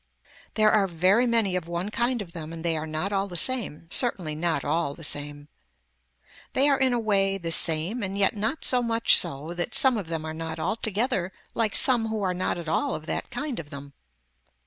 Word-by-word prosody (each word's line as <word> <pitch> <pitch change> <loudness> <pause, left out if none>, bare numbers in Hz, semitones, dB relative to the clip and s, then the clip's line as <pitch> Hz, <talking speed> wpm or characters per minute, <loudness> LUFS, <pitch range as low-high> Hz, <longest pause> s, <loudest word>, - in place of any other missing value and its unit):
There 215 -1 +3
are 205 -2 +2
very 185 +8 +2
many 225 -5 +2
of 180 -2 -4
one 175 +4 -4
kind 240 0 -1
of 170 - -16
them 165 -2 -8
and 165 0 -8
they 165 -1 0
are 155 0 -5
not 155 +6 -3
all 195 0 -1
the 175 -2 -5
same, 200 - +2
certainly 185 -11 0
not 165 +1 -2
all 150 -1 -1
the 165 - -12
same. 145 0 -1 1.1
They 275 +2 +3
are 280 -1 +2
in 265 -1 +2
a 240 - 0
way 195 -3 +1
the 170 -3 -5
same 165 +9 +3
and 195 -1 -4
yet 200 +3 +2
not 220 +9 -2
so 250 -1 +4
much 230 -1 +3
so 145 +5 +1
that 175 0 -1
some 260 -4 +6
of 190 - -8
them 160 -1 -4
are 155 - -5
not 160 0 -6
altogether 210 - -2 0.2
like 220 -3 -1
some 250 -4 +3
who 220 -2 -4
are 185 -1 -1
not 180 0 -2
at 170 -2 -8
all 275 - -1
of 155 - -8
that - - -4
kind 265 +1 -5
of 145 - -9
them. 140 0 -11
190 Hz, 215 wpm, -25 LUFS, 160-225 Hz, 1.1 s, some